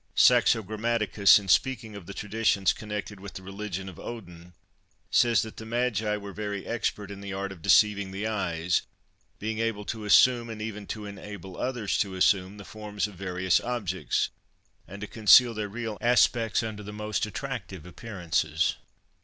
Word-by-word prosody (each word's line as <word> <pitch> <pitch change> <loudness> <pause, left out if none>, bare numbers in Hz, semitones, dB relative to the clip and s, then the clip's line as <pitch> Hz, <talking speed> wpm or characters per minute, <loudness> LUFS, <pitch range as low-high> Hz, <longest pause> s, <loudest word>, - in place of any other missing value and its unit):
Saxo 110 -2 +5
Grammaticus, 105 -1 +3
in 100 -2 -5
speaking 110 +1 +1
of 100 -4 -10
the 100 - -7
traditions 105 -4 +1
connected 105 -1 -6
with 100 0 -10
the 95 - -7
religion 95 -1 -5
of 90 -4 -10
Odin, 90 -7 -9 0.6
says 120 -3 +4
that 110 - -9
"the - - -7
magi 115 -3 0
were 100 -1 -8
very 105 -1 -4
expert 105 -3 -2
in 100 0 -8
the 100 -1 -6
art 100 0 -3
of 90 -4 -11
deceiving 100 +2 +4
the 95 +3 -4
eyes, 90 -6 0 0.6
being 110 +1 -3
able 115 -2 -1
to 110 0 -5
assume, 120 +3 +5
and 110 -1 -6
even 105 -2 -6
to 105 -1 -5
enable 100 -2 -9
others 120 -4 -2
to 95 -3 -1
assume, 95 +1 +2
the 100 - -10
forms 105 -1 -4
of 105 - -7
various 95 0 +1
objects, 105 -7 -1 0.6
and 100 +1 -10
to 105 - -4
conceal 115 +3 +6
their 105 -2 -4
real 110 -2 -5
aspects 115 -2 +3
under 110 -2 -5
the 105 0 -8
most 105 0 -2
attractive 105 - -6
appearances." 85 -4 -1
105 Hz, 170 wpm, -27 LUFS, 95-110 Hz, 0.6 s, conceal